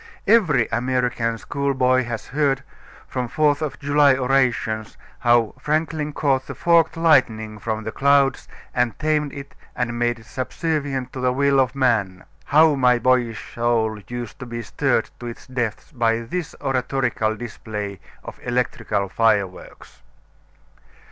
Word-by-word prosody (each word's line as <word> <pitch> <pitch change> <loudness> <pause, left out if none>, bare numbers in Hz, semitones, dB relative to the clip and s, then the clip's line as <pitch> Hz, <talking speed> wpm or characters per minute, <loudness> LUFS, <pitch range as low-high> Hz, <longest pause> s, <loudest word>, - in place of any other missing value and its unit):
Every 175 - +4
American 120 -1 0
schoolboy 130 -1 +1
has 115 -2 -5
heard, 140 -1 +1 0.4
from 125 -1 -3
Fourth 145 +3 +1
of 155 -3 -3
July 145 -1 +4
orations, 125 -5 0 0.2
how 120 -2 +3
"Franklin 150 +1 -1
caught 135 -3 0
the - - -6
forked 165 -1 +3
lightning 110 -10 +2
from 110 +1 -3
the 110 - -4
clouds 140 0 +2 0.3
and 125 -2 0
tamed 150 -2 0
it 140 0 -9 0.2
and 120 -1 -2
made 120 0 +1
it 115 - -16
subservient 140 0 -3
to 130 - -6
the 125 0 +2
will 140 +1 +2
of 130 0 +1
man." 110 -9 +1 0.2
How 155 +2 +5
my 125 -3 +3
boyish 120 -2 0
soul 115 -2 0
used 120 -2 -6
to 125 - -7
be 120 0 -5
stirred - - 0
to 120 - -7
its 115 - -8
depths 125 -1 -4
by 115 -4 +1
this 160 +8 -5
oratorical 125 -4 0
display 105 -3 -6 0.2
of - - -9
electrical 115 -4 -1
fireworks! 100 -3 -1
125 Hz, 140 wpm, -22 LUFS, 115-140 Hz, 0.4 s, How